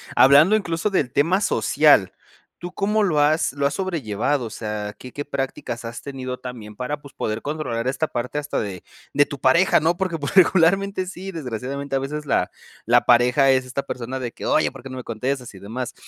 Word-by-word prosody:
hablando 145 +10 +7
incluso 170 -2 -1
del 145 -10 0
tema 175 +7 +2
social, - - +3 0.5
¿tú 175 +1 -8
cómo 210 +2 +1
lo 165 -7 +2
has 150 0 +2
lo 140 0 +1
has 140 - -4
sobrellevado? 145 - -1
O 115 - -5
sea, 105 -1 -5
¿qué 125 - -10
qué 145 - -5
prácticas 130 -4 -4
has 115 0 -6
tenido 130 -2 -6
también 115 -4 -8
para, 135 +6 -4
pues, 140 -2 -14
poder 110 +1 -3
controlar 140 -6 -3
esta 135 +4 0
parte 125 +3 -3
hasta 145 0 -3
de 95 -4 -5 0.3
de 145 - +4
tu 140 - -7
pareja, 135 +9 +4
¿no? 165 +3 +1
Porque 180 -2 -2
pues 145 -2 -4
regularmente 190 +1 +4
sí, 190 +1 -7
desgraciadamente 135 - -4
a 135 - +2
veces 150 +3 -5
la 130 -10 +1 0.4
la - - +4
pareja 125 +3 +5
es 130 -1 +2
esta 130 +2 -3
persona 130 0 -5
de 125 -2 -4
que: - - -7
"Oye, - - +2
¿Por - - -12
qué 135 - -9
no 130 - -7
me 125 - -6
contestas 125 +2 -3
y 95 - -12
demás?" 120 +5 -5
140 Hz, 205 wpm, -22 LUFS, 125-160 Hz, 0.5 s, hablando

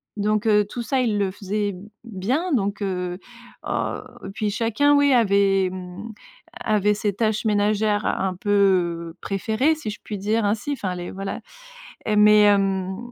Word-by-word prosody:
Donc, 210 +1 0
heu, 210 -1 +4
tout 240 - -5
ça 260 +3 0
il 225 -4 0
le 200 -2 +1
faisait 205 0 -3 0.3
bien 235 - -2
donc, 205 -4 -1
heu, 180 -2 -2 0.5
au - - -2 0.3
puis 210 0 -1
chacun, 230 +7 +2
oui, 285 0 +4
avait, 200 -4 +3
mmh, 185 +4 -8 0.5
avait 210 -1 +2
ses 210 0 -1
tâches 215 +1 -1
ménagères 210 0 +1
un 190 -1 -1
peu 180 -4 +1
préférées, 220 +9 0
si 305 -8 -5
je 210 - -7
puis 205 -2 -6
dire 215 +3 0
ainsi, 215 +8 -1
enfin, 200 -9 -3
les 175 -1 -6
voilà. 195 0 -5 0.7
Et 210 -1 +1
mais, 210 0 +7
hem, 195 -2 +2
205 Hz, 155 wpm, -23 LUFS, 195-220 Hz, 0.7 s, mais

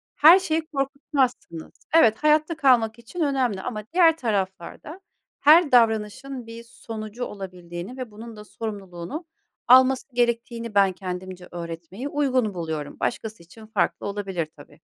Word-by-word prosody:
her 330 +6 +8
şeyi 325 -3 -1
korkutmazsınız. 275 - -2 0.3
Evet, 220 -9 +5
hayatta 305 +2 +2
kalmak 240 -5 +3
için 280 +9 -7
önemli 260 -9 0
ama 215 0 -5
diğer 330 -3 +5
taraflarda 210 - -4 0.4
her 310 +1 +6
davranışın 230 +2 +1
bir 230 0 -9
sonucu 225 0 -7
olabildiğini 180 +2 -8
ve 255 -4 -6
bunun 225 +2 -10
da 210 - -10
sorumluluğunu 205 - -7 0.4
alması 260 +1 +5
gerektiğini 235 -2 -1
ben 195 -1 +5
kendimce 180 0 -7
öğretmeyi 170 - -7
uygun 260 -7 0
buluyorum. 160 -4 -5
Başkası 220 -6 -3
için 215 +6 -15
farklı 220 - -1
olabilir 195 -5 -3
tabii. 145 +2 -16
225 Hz, 130 wpm, -24 LUFS, 190-270 Hz, 0.4 s, her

